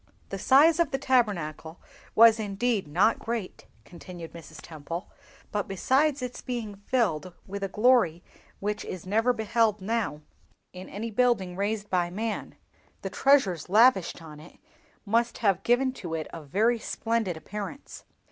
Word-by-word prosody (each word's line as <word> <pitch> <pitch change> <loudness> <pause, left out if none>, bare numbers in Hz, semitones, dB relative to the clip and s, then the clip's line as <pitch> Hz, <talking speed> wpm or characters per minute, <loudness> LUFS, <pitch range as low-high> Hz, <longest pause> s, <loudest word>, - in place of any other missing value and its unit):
"The - - -5
size 305 +5 +5
of 335 -4 +3
the 270 - -1
Tabernacle 180 - 0 0.4
was 230 0 +7
indeed 210 -1 -1
not 185 +9 +2
great," 225 -5 -5 0.2
continued 175 -1 -10
Mrs. 160 -2 -11
Temple; 165 +3 -7 0.4
"but, 205 -1 -2
besides 265 +8 +1
its 250 0 -6
being 235 -4 -4
filled 195 -5 -1
with 200 +1 -6
a 195 - -1
glory 210 -5 +3 0.4
which 210 +1 -3
is 185 -1 -7
never 225 +6 +2
beheld 220 -2 +1
now 200 -7 -2 0.5
in 185 0 -9
any 225 +3 -5
building 210 -6 +1
raised 205 +2 -2
by 175 -2 +1
man, 215 +4 -4 0.5
the - - -4
treasures 200 - +2
lavished 205 -5 +4
on 150 -2 -11
it 160 +3 -15 0.5
must 230 +3 +1
have 195 -5 +1
given 255 +4 +2
to 170 -9 -6
it 160 -1 -3
a 165 - -7
very 215 - +1
splendid 225 -7 -2
appearance. 210 - -8
210 Hz, 145 wpm, -27 LUFS, 180-235 Hz, 0.5 s, was